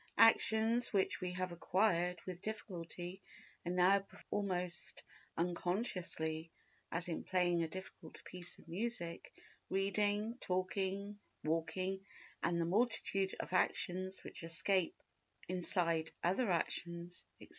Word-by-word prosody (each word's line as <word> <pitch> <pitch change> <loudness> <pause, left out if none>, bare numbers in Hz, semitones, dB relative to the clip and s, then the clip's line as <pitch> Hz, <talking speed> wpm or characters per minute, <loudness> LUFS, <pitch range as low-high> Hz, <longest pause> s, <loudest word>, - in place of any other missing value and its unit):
Actions 225 +1 +6
which 195 -1 +2
we 180 -1 -1
have 185 0 -2
acquired 180 0 +2
with 180 -1 -5
difficulty 185 -4 -5 0.4
and 175 +1 -1
now 185 +2 +6
perform 200 +1 -4
almost 180 -1 -2 0.3
unconsciously—as 170 -2 -2
in 170 - -2
playing 175 -2 +2
a 165 - +1
difficult 185 -1 -8
piece 180 -1 -7
of - - -17
music, 175 -2 -3 0.4
reading, 205 +4 +1
talking, 195 +2 -1 0.2
walking 165 +5 0 0.4
and 170 0 +1
the 165 - +2
multitude 195 -1 +2
of - - -4
actions 185 +1 +1
which - - -5
escape 175 +2 +2
our - - -28
notice 185 - 0
inside 165 -4 +2
other 195 +7 +2
actions, 170 0 -1
etc. - - -13
185 Hz, 120 wpm, -37 LUFS, 170-195 Hz, 0.4 s, Actions